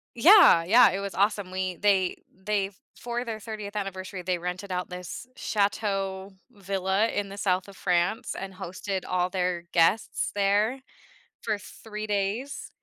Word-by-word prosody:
Yeah, 325 - +8
yeah, 230 +8 +7
it 195 - -2
was 200 -1 -5
awesome, 200 -1 +1
we 185 -1 -2
they 195 -3 +2
they 195 +1 -1
f 195 - -19 0.2
for 240 0 -3
their 225 -3 -5
30th 210 -2 -7
anniversary, 190 -1 -5
they 180 0 -1
rented 180 +3 -5
out 180 0 -2
this 180 +5 -7
chateau 200 -2 -1 0.2
villa 195 0 0
in 205 -3 -2
the 200 - -9
South 185 -2 0
of 195 - -13
France 180 +6 0
and 195 0 -6
hosted 190 +1 -4
all 180 0 +1
their 180 -2 -1
guests 175 +6 +2
there 205 +6 +2 0.6
for 215 -2 -1
3 215 +1 -8
days. 210 +6 -2
195 Hz, 155 wpm, -27 LUFS, 185-210 Hz, 0.6 s, Yeah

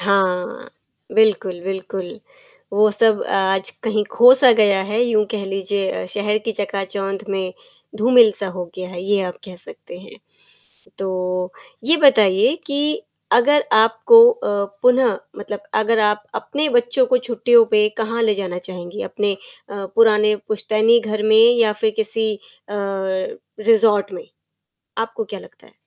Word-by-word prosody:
हाँ। 190 -3 -1 0.4
बिल्कुल, 200 -5 +1
बिल्कुल। 190 +2 -6 0.5
वो 210 +1 +3
सब 210 0 +2
अ, - - -5
आज 190 0 0
कहीं 215 -2 -1
ख़ो-सा 255 +2 +6
गया 205 -3 +3
है, 210 +4 -2
यूँ 225 -3 +1
कह 215 -3 -4
लीजिए 195 0 -3
अ, - - -7
शहर 210 - -1
की 225 - -2
चकाचौंध 195 0 -4
में 190 -2 -3 0.4
धूमिल-सा 225 -3 +3
हो 180 0 -6
गया 185 -1 -7
है, 180 -1 -8
ये 200 +1 0
आप 180 -1 -6
कह 185 -2 -11
सकते 175 0 -13
हैं। 190 - -15 0.8
तो 185 -1 -3 0.3
ये 320 +6 +4
बताइए 225 - +4
कि 295 +8 -1 0.3
अगर 290 +4 +3
आपको 225 - +6
अ, 205 - -3 0.2
पुनः 250 -4 +3 0.2
मतलब 205 0 -7
अगर 220 +1 +1
आप 210 0 +1
अपने 295 +1 -2
बच्चों 240 +1 +1
को 255 - +2
छुट्टियों 240 -1 +3
पे 210 -1 +3
कहाँ 230 +1 -2
ले 215 -2 +2
जाना 185 -3 -5
चाहेंगी 180 +1 -9
अपने 205 -1 -2
अ, - - -18 0.6
पुराने 215 -1 +4
पुश्तैनी 215 +2 +2
घर 215 -1 -4
में 215 0 +3 0.2
या 220 -2 +3
फ़िर 215 +1 -1
किसी 220 0 -2
अ, 200 - -25 1.2
रिसॉर्ट 215 -2 +2
में? 180 - -9 0.7
आपको 455 - -3
क्या - - -8
लगता - - -18
है? - - -24
210 Hz, 150 wpm, -19 LUFS, 195-230 Hz, 1.2 s, ख़ो-सा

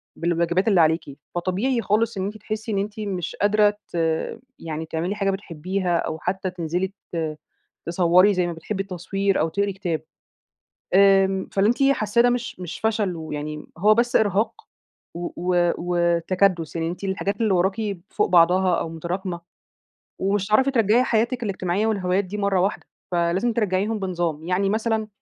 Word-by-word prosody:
بالواجبات 170 +3 0
اللي 190 -6 +5
عليكِ، 155 -3 +1 0.2
فطبيعي 200 +8 0
خالص 215 +2 +1
إن 190 - -1
أنتِ 210 +2 -5
تحسّي 215 +1 -5
إن 200 - 0
أنتِ 210 +2 -4
مش 190 -5 -3
قادرة 210 0 +3 0.2
ت - - -5 0.6
يعني 160 0 -5
تعملي 170 +5 -2
حاجة 195 -1 0
بتحبيها، 185 -1 -2
أو 160 - -2
حتّى 190 +2 -2
تنزلي 180 +1 -2 0.3
ت 160 -2 -2 0.5
تصوّري 180 +3 +4
زي 180 -1 +1
ما 170 - -3
بتحبي 195 +5 -4
التصوير 195 +1 -1
أو 165 - +1
تقري 200 +2 -1
كتاب، 175 -4 -3 0.9
آمم 195 -1 +4
فاللي 200 +2 +3
أنتِ 245 +4 +1
حاسّاه 215 0 +2
ده 245 - +4
مش 240 -6 -3
مش 175 -1 -6
فشل 215 -5 0
ويعني 150 -1 -5
هو 210 +3 +5
بس 240 +1 +2
إرهاق 215 +1 +1 0.5
و 175 0 -4
و 175 -1 +2
وتكدُس؛ 175 0 +1
يعني 165 0 -1
أنتِ 180 +3 -6
الحاجات 200 +2 -2
اللي 215 -4 +2
وراكِ 195 +2 0
فوق - - +1
بعضها 180 +1 +4
أو - - -3
متراكمة، 175 +2 -4 0.8
ومش 195 +1 0
هتعرفي 260 +6 +3
ترجعي 230 0 +3
حياتِك 240 +1 0
الاجتماعية 195 +1 -1
والهوايات 195 -2 +1
دي 205 +3 -6
مَرّة 200 -2 +1
واحدة، 195 +3 -1 0.2
فلازم 175 +7 +1
ترجّعيهم 210 0 0
بنظام، 175 -5 -2
يعني 185 +3 0
مثلًا 220 0 0
190 Hz, 160 wpm, -23 LUFS, 175-210 Hz, 0.9 s, اللي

